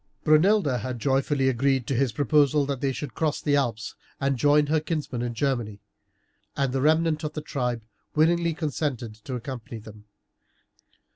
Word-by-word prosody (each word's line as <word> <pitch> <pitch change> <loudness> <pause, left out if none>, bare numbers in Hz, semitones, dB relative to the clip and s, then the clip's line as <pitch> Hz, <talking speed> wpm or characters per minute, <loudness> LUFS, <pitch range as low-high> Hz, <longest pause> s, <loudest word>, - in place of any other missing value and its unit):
Brunilda 155 - +4
had 125 +3 -4
joyfully 135 +2 +1
agreed 130 0 +1
to - - -2
his 130 0 +1
proposal 145 +3 +3
that 135 -2 -3
they 135 - +1
should 130 -1 -6
cross 155 +2 -1
the 145 -1 +1
Alps 115 -6 -1 0.3
and 135 0 +1
join 145 +3 +4
her 155 +2 +2
kinsmen 150 -6 -3
in 120 -1 -3
Germany, 120 -6 -1 0.8
and 135 -2 0
the 135 - 0
remnant 155 +1 +2
of 150 0 -3
the 155 - -4
tribe 125 -6 -3 0.3
willingly 165 +1 +3
consented 145 -7 -3
to 110 +4 -7
accompany 120 -1 -6
them. 105 -1 -13
135 Hz, 160 wpm, -26 LUFS, 120-150 Hz, 0.8 s, Brunilda